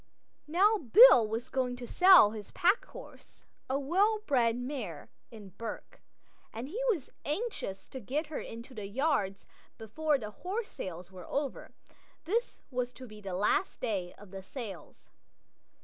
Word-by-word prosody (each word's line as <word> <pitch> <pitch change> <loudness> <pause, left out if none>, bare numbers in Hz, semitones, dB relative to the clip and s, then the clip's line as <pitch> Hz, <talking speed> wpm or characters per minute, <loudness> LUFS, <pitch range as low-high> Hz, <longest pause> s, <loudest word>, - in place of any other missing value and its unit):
Now 400 +7 +4
Bill 260 - +8
was 225 +3 -3
going 255 -2 -1
to 245 0 -8
sell 365 - +7
his 215 -2 -8
packhorse, 390 +8 -2 0.3
a 270 +1 +1
well 385 +10 +2
bred 240 - +2
mare, 245 - -6 0.2
in 210 -4 -11
Bourke, 215 +4 -8 0.5
and 230 +4 -6
he 415 - -4
was 345 - -1
anxious 300 - -4
to 260 - -7
get 275 +8 -2
her 300 - -5
into 235 +3 -9
the 210 -4 -6
yards 205 -5 -1 0.3
before 290 +7 0
the 215 -5 -7
horse 405 - -4
sales 180 0 -7
were 180 -2 -11
over; 280 -2 -3 0.6
this 460 +8 -2
was 250 -1 -2
to 255 +1 -10
be 215 -3 -12
the 190 -3 -5
last 370 - +1
day 195 -7 -3
of 205 -2 -15
the 195 -1 -7
sales. 200 -2 -9
250 Hz, 150 wpm, -31 LUFS, 210-320 Hz, 0.6 s, Bill